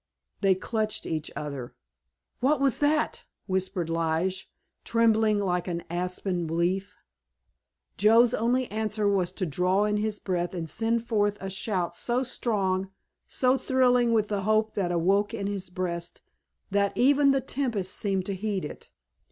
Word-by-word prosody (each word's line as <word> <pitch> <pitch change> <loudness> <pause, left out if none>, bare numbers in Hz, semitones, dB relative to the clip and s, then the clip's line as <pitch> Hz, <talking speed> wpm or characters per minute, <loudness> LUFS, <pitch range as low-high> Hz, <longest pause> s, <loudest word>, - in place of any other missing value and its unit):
They 195 -2 +4
clutched 215 +2 -2
each 155 -1 -3
other. 140 -5 -6 0.6
"What 275 +3 +2
was 275 -2 +2
that?" 300 +1 +1 0.2
whispered 185 -2 -1
Lige, 165 +3 -1 0.3
trembling 220 -2 +3
like 180 -3 -1
an 170 -1 -3
aspen 180 0 -2
leaf. 180 +5 -1 1.0
Joe's 225 +3 +5
only 245 +3 +1
answer 215 -1 -1
was 190 -3 +1
to 185 - -2
draw 180 +5 +1
in 210 0 +1
his 210 0 -1
breath 180 -2 -2
and 165 -2 -4
send 230 +7 0
forth 205 -3 +1
a 195 0 -5
shout 185 -3 -2
so 245 +7 0
strong, 195 -7 -1 0.4
so 255 +1 +2
thrilling 250 -2 +3
with 215 -2 +2
the 205 -2 -1
hope 215 +2 +1
that 185 -4 -1
awoke 195 +6 +2
in 200 -3 -4
his 195 -3 -3
breast 175 -1 -4 0.5
that 200 0 +1
even 280 +2 +5
the 275 0 +4
tempest 240 -8 -2
seemed 195 -3 -1
to 200 - -2
heed 195 -2 -2
it. - - -9
200 Hz, 150 wpm, -27 LUFS, 180-225 Hz, 1.0 s, Joe's